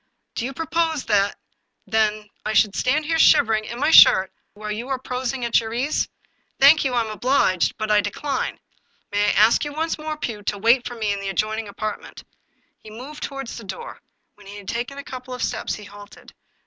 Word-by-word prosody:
" - - -51
" - - -54
Do 230 - -3
you 270 - -4
propose, 325 0 -1
then, 205 -2 +2 0.5
that 215 -1 0 0.2
I 215 - -2
should 210 -2 +3
stand 295 +4 +1
here 325 +1 0
shiver 225 -7 +5
ing 215 0 0
in 235 - -7
my 300 - +2
shirt 190 -10 +7 0.2
while 210 0 -6
you 225 +4 -5
are 265 - 0
prosing 255 0 -3
at 235 - +3
your 225 0 -5
ease? 270 +5 -1 0.5
Thank 285 +3 +7
you; 265 -2 -1
I 240 - +3
am 220 -1 -4
obliged, 215 -6 +1
but 215 -1 -2
I 210 0 +5
decline. 260 +7 -3 0.5
May 205 0 +1
I 205 - +3
ask 220 +6 +4
you 295 -1 -5
once 320 +1 -2
more, 310 0 -4
Pugh, 230 -8 -5
to 205 0 -3
wait 235 +5 +3
for 245 - -7
me 215 -3 -1
in 200 - -4
the 195 0 -4
adjoining 215 +2 -2
apartment? 215 +1 -6 0.3
" - - -44
He 215 - -11
moved 255 +8 -10
toward 275 -1 -5
the 230 -1 -8
door. 470 - -8 0.3
When 205 -1 -18
he 205 +1 -9
had 200 -2 -12
taken 245 +4 -4
a 280 - -6
couple 255 -1 -8
of 250 - -4
steps, - - -2
he 210 - -10
halted. 205 0 -14
230 Hz, 225 wpm, -22 LUFS, 210-275 Hz, 0.5 s, shirt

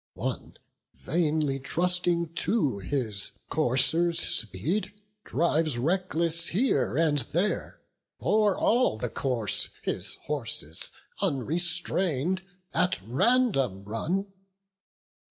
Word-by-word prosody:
One, - - -4 0.4
vainly 155 -3 0
trusting 170 +2 0
to 165 - 0
his 105 -2 -2 0.2
coursers' 160 +5 +2
speed, 115 - 0 0.3
Drives 160 -5 +1
reckless 170 +2 +1
here 185 - +1
and 155 -3 +3
there; 175 - -1 0.4
o'er 210 -2 +2
all 240 - +3
the 120 +2 -3
course, 120 -4 0
His - - -1
horses, 110 - -2 0.3
unrestrain'd, 170 +3 +1 0.3
at 180 - +2
random 135 - +2
run. 155 - -2
160 Hz, 85 wpm, -28 LUFS, 125-180 Hz, 0.4 s, and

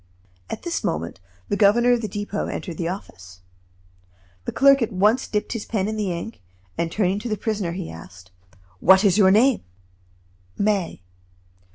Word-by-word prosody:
At - - -6
this 345 -1 -3
moment, 85 +3 -3 0.3
the - - 0
governor 225 +4 +4
of 240 - 0
the 215 - -3
Depot 205 +1 -4
entered 170 -4 -6
the 170 - -1
office. 90 - -8 1.0
The - - -2
clerk 275 0 +5
at 230 - 0
once 210 +6 +2
dipped 210 +2 -2
his 230 -3 -5
pen 200 -4 -1
in 215 - -3
the 210 -4 -1
ink, 170 - -6 0.3
and 170 -1 -2
turning 195 0 0
to 240 - -5
the 215 - -1
prisoner 205 -5 -2
he 180 -1 -5
asked: 90 +3 -13 0.5
"What 190 - +6
is 200 0 +3
your 190 -2 +6
name?" 230 +6 +4 1.0
"May." 200 - -1
205 Hz, 170 wpm, -23 LUFS, 175-220 Hz, 1.0 s, What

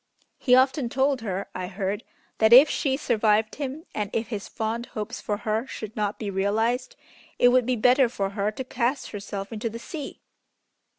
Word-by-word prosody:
He 250 - +5
often 260 0 +3
told 270 0 +1
her, 195 -3 -3
I 185 0 -4
heard, 195 +1 -3 0.4
that 220 0 +4
if 260 +5 +10
she 270 -4 0
survived 220 -5 +2
him, 280 +4 -4
and 210 -2 -2
if 225 0 -2
his 210 -4 -4
fond 230 +1 -3
hopes 210 -2 -6
for 205 - -2
her 220 +3 -2
should 215 -3 -7
not 210 -1 -1
be 205 -3 -4
realized, 220 +6 0 0.4
it 245 - +6
would 250 -1 +3
be 255 - +2
better 250 +2 +4
for 195 -4 -2
her 200 +1 -1
to 215 +5 -5
cast 255 +2 -2
herself 200 0 -6
into 225 +1 -3
the 225 - -7
sea." 285 +4 -7
225 Hz, 185 wpm, -25 LUFS, 210-255 Hz, 0.4 s, if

